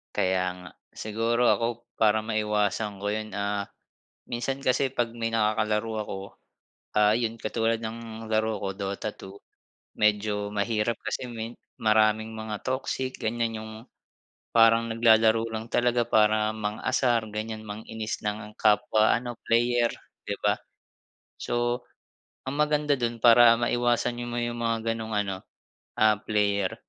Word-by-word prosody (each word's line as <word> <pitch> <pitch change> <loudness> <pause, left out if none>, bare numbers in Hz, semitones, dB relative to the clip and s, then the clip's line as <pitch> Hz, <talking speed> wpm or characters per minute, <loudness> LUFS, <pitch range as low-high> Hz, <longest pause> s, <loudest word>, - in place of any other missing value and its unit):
Kaya 95 0 +2 0.2
nga. 90 - -10 0.2
Siguro 115 +3 0
ako 120 0 0
para 110 -1 +3
maiwasan 105 -2 -1
ko 105 - -3
yun, 110 +1 -2
ah, 100 0 -2 0.7
minsan 135 +3 -3
kasi 130 +1 +2
'pag 120 -3 -1
may 115 -1 -3
nakakalaro 110 0 0 0.2
ako, 95 - -5 0.8
ah 105 0 +5
'yon 115 0 0
katulad 115 +1 0
ng 115 0 -7
laro 110 -1 0
ko 95 - -1
Dota 100 +2 -4
2, 95 -1 -12 0.6
medyo 105 -1 +1
mahirap 105 +2 0
kasi 125 - -3
me 115 0 -7 0.2
maraming 110 0 +2
mga 110 -1 -5
toxic, 130 0 -3
ganyan. 115 0 -1
'Yung 110 0 -8 0.8
parang 115 0 +5
naglalaro 115 0 +4
lang 110 +1 -5
talaga 120 0 +2
para 110 -1 +3
mang-asar 110 +3 0
ganyan 110 +1 -5
mang-inis 110 +1 -5
lang 105 +1 -2
ng 105 0 -12
kapwa 110 0 +3
ano 120 -1 -4
player 120 0 +2 0.3
'di - - -1
ba? - - +2 0.8
So, 120 +1 -1 0.6
ang 140 - -4
maganda 150 -1 +2
do'n 120 -1 -2
para 120 0 +8
maiwasan 120 0 +1
niyo 120 - -4
mo 120 - -3
'yung 120 0 -3
mga 115 -1 0 0.2
gano'ng 110 -1 -5
ano, 95 -2 -4 0.6
ah, 110 -1 +5
player, 100 -3 0
110 Hz, 135 wpm, -27 LUFS, 105-120 Hz, 0.8 s, para